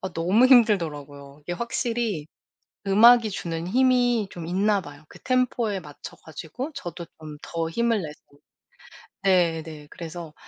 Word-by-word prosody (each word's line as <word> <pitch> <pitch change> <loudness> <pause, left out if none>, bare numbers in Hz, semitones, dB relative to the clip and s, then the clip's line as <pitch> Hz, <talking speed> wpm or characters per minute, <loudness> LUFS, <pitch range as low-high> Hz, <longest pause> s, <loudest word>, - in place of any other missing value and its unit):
아 190 -2 -5
너무 185 +10 +3
힘들더라고요. 150 - +2
이게 175 - -5
확실히 235 - -2 0.6
음악이 225 +3 +6
주는 165 -3 -4
힘이 245 -2 +2
좀 170 -2 -8
있나 200 +3 +1
봐요. 145 -2 -13
그 - - -15
템포에 245 -5 0
맞춰 145 -3 -11
가지고 165 - -7
저도 175 - -7 0.2
좀 155 -1 -9
더 165 -1 -3
힘을 230 +3 0
내서 150 -1 -7 1.1
네네 165 -5 0
그래서 165 -1 -8
180 Hz, 275 characters per minute, -24 LUFS, 160-235 Hz, 1.1 s, 음악이